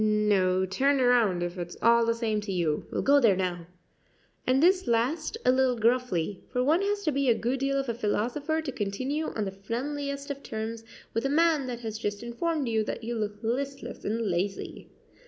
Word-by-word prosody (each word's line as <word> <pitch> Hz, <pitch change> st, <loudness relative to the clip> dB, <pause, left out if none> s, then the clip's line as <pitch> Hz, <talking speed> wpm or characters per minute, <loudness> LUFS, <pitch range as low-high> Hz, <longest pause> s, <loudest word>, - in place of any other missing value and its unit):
"No; 200 Hz, -3 st, +2 dB
turn 275 Hz, +9 st, +2 dB
round; 235 Hz, -8 st, +3 dB
if 175 Hz, +1 st, -4 dB
it's 175 Hz, 0 st, -6 dB
all 235 Hz, 0 st, +4 dB
the 230 Hz, -, +2 dB
same 220 Hz, -2 st, -1 dB
to 205 Hz, -1 st, -5 dB
you 165 Hz, -5 st, -1 dB
we'll -, -, -2 dB
go 285 Hz, +1 st, +5 dB
there 225 Hz, -7 st, +5 dB
now;" 175 Hz, -2 st, -2 dB, 0.8 s
and 260 Hz, +3 st, +3 dB
this 370 Hz, -2 st, +4 dB
last 270 Hz, -, 0 dB
a -, -, +6 dB
little 260 Hz, -1 st, +2 dB
gruffly; 225 Hz, -6 st, 0 dB
for 250 Hz, -1 st, +1 dB
one 315 Hz, +7 st, +3 dB
has 405 Hz, 0 st, -1 dB
to 310 Hz, -, +1 dB
be 275 Hz, -1 st, +1 dB
a 235 Hz, -, +5 dB
good 250 Hz, +3 st, -1 dB
deal 275 Hz, +1 st, 0 dB
of 270 Hz, -1 st, -1 dB
a 235 Hz, -, 0 dB
philosopher 250 Hz, +8 st, -1 dB
to 285 Hz, -, -3 dB
continue 260 Hz, +9 st, -2 dB
on 215 Hz, -, -2 dB
the 195 Hz, -, -3 dB
friendliest 280 Hz, +8 st, -4 dB
of 280 Hz, 0 st, -6 dB
terms 225 Hz, -1 st, -5 dB, 0.3 s
with 225 Hz, -, -1 dB
a 275 Hz, -, 0 dB
man 310 Hz, -2 st, +3 dB
that 240 Hz, -1 st, -5 dB
has 220 Hz, -2 st, -5 dB
just 205 Hz, 0 st, -3 dB
informed 285 Hz, +5 st, -2 dB
you 220 Hz, -1 st, +1 dB
that 225 Hz, -, -5 dB
you 235 Hz, +2 st, -3 dB
look 210 Hz, -1 st, -4 dB
listless 270 Hz, +4 st, -3 dB
and 225 Hz, +3 st, -1 dB
lazy. 195 Hz, +1 st, -3 dB
235 Hz, 205 wpm, -28 LUFS, 210-275 Hz, 0.8 s, a